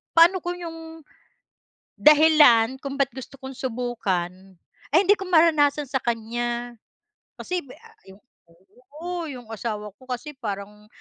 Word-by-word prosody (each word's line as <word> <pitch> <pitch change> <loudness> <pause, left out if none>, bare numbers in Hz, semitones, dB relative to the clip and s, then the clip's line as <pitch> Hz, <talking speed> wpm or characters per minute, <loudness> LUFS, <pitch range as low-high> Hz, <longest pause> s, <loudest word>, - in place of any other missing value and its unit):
paano 345 +3 +6
kung 350 +1 -4
yung 325 -1 -9 1.0
dahilan 295 -6 +6
kung 275 0 -6
ba't 275 -1 +1
gusto 265 +2 -10
kong 265 0 -9
subukan 240 -9 -2 0.6
ay 310 - +5
hindi 410 - +6
ko 385 -2 -8
maranasan 305 -4 +4
sa 265 0 -2
kanya. 240 +1 -3 0.6
Kasi 360 0 -3
bi 255 - -12
ah 455 -1 -19 0.2
ah 205 - -23 0.8
oo, 350 -1 -4
yung 250 -6 -9
asawa 210 -1 -5
ko 260 - -18
kasi 255 +4 -5
parang 210 -2 -7
265 Hz, 135 wpm, -24 LUFS, 235-320 Hz, 1.0 s, paano